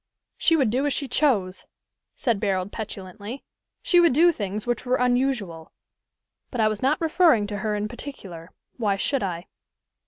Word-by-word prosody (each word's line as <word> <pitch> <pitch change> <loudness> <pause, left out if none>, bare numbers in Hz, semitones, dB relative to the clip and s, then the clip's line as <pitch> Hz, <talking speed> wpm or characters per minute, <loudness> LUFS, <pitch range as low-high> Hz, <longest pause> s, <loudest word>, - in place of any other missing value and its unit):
"She 330 - +4
would 265 -9 +2
do 265 +5 +1
as 285 - 0
she 280 - -2
chose," 220 -9 0 0.5
said 235 -6 0
Barold 195 -1 -1
petulantly. 205 +3 -7 0.4
"She 350 - +4
would 340 -6 +5
do 340 +5 +5
things 205 - -4
which 240 0 -1
were 255 0 +1
unusual; 245 -10 0 0.8
but 250 - -5
I 220 - +4
was 215 -1 -2
not 285 +6 +2
referring 320 - +3
to 205 0 -5
her 210 +1 -1
in 210 0 -2
particular. 200 - -9 0.3
Why 210 -5 +1
should 270 +7 0
I?" 175 -2 -3
225 Hz, 165 wpm, -24 LUFS, 200-275 Hz, 0.8 s, would